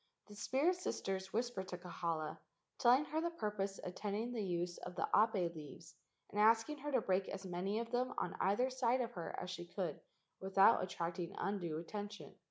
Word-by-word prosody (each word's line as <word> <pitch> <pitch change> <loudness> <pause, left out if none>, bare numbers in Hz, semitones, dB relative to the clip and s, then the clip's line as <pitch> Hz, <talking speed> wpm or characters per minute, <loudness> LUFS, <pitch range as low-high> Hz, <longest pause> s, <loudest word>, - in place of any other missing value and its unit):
The 205 - -12
spirit 280 - +2
sisters 190 - -2
whispered 230 -5 -1
to 180 - -4
Kahala, 165 -3 -3 0.4
telling 255 +3 +6
her 315 +1 -1
the 340 - +1
purpose 205 - -2
attending 205 +5 -2
the 230 -3 -2
use 175 -1 -1
of 180 - -7
the - - 0
ape 200 -6 +3
leaves 160 +2 -10 0.4
and 205 - -2
asking 225 +7 +5
her 295 +2 -3
to 255 -4 +3
break 190 -1 +1
as 190 - -5
many 185 +3 -1
of 230 0 -3
them 250 +1 +1
on - - -1
either 245 +7 +2
side 255 0 +2
of 235 -1 -2
her 175 -8 -5
as 180 - -4
she 175 -1 -6
could 175 -4 -3 0.4
without 195 +3 +5
at¬ 185 - -2
tracting 170 0 -3
undue 175 -5 -1
attention. 205 +5 -6
200 Hz, 185 wpm, -38 LUFS, 180-235 Hz, 0.4 s, telling